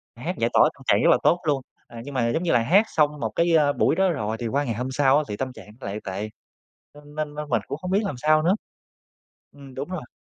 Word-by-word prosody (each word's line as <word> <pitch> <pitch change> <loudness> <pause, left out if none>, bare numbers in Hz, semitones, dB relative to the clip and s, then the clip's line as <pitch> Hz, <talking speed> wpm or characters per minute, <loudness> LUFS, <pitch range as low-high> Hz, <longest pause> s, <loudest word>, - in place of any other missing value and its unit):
Hát - - -5
giải - - +1
tỏa - - +6
tâm - - -17
trạng - - +3
rất - - +5
là - - +5
tốt 175 - +4
luôn, 140 -3 +1 0.3
à, 115 -1 -10
nhưng 140 +1 -8
mà 120 -2 +1
giống 160 +8 -1
như 170 - +1
là - - +4
hát 190 - +4
xong 150 -1 +2
một - - -1
cái, 170 0 +3
a, 145 -2 +4
buổi - - +2
đó 190 0 +3
rồi 110 -8 -2
thì 120 - -3
qua 140 +5 0
ngày 120 -4 -2
hôm 125 +3 -3
sau 135 0 +3
á 155 - +1
thì 105 - -4
tâm 130 -1 -4
trạng - - -13
nó - - -9
lại 100 +2 -4
tệ, 100 +3 -4 0.7
nên 145 0 -15
nên 150 -1 -4
nên 150 0 -6
mình 115 -4 +1
cũng 145 - -5
không 180 +2 -6
biết 200 +2 +3
làm 170 - -3
sao 155 +2 +3
nữa 180 +4 +3 1.0
ừm, 140 -2 -13
đúng 140 +5 -5
rồi. 170 -9 -6
145 Hz, 280 wpm, -24 LUFS, 125-155 Hz, 1.0 s, tỏa